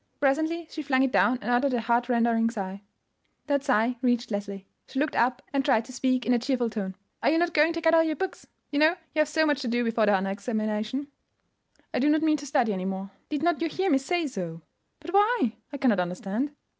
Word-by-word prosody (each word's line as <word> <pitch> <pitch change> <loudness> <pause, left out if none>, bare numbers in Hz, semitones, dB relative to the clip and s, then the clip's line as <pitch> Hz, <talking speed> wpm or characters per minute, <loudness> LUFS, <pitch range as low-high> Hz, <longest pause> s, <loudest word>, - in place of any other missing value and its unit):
Presently 315 +5 +1
she 310 - -5
flung 265 -2 +2
it 270 - +1
down 255 0 +3
and 245 - -1
uttered 250 +2 +2
a 235 - 0
heartrending 235 -1 +2
sigh. 195 -3 -5 0.6
That 285 -2 0
sigh 245 -2 +2
reached 245 -3 +1
Leslie. 200 -1 -4 0.2
She - - -8
looked 295 +2 0
up, 245 +1 +1
and 275 -1 +1
tried 230 -5 +2
to 255 - -11
speak 255 -2 0
in 245 - +3
a 240 - +3
cheerful 245 -2 -1
tone. 195 -4 -4 0.3
"Are - - +3
not 345 +1 +2
you - - -20
going 310 +2 +4
to 335 - -4
get 325 0 +3
out 325 0 +5
your 310 - -1
books? 380 +2 -5 0.2
You 290 - 0
know 315 +3 +5 0.2
you 310 - -1
have 305 - +4
so 315 +1 +2
much 290 -2 +1
to 260 - -3
do 240 +1 +1
before 230 -2 +1
the 205 - +5
honor 195 0 -1
examination?" 215 +5 -3 0.8
"I - - 0
do 285 +4 +3
not 310 +1 +3
mean 310 -1 +3
to 290 0 -8
study 255 -6 +1
any 185 -1 -3
more. 195 +1 -4 0.2
Did 300 0 -2
not 345 -1 +1
you 335 - +1
hear 375 +3 0
me 270 - +4
say 345 +4 -1
so?" 175 - -6 0.4
"But 335 +3 -8
why? 410 - +3
I 285 - -5
cannot 250 -8 +2
understand." 195 +10 -3
255 Hz, 235 wpm, -27 LUFS, 220-300 Hz, 0.8 s, out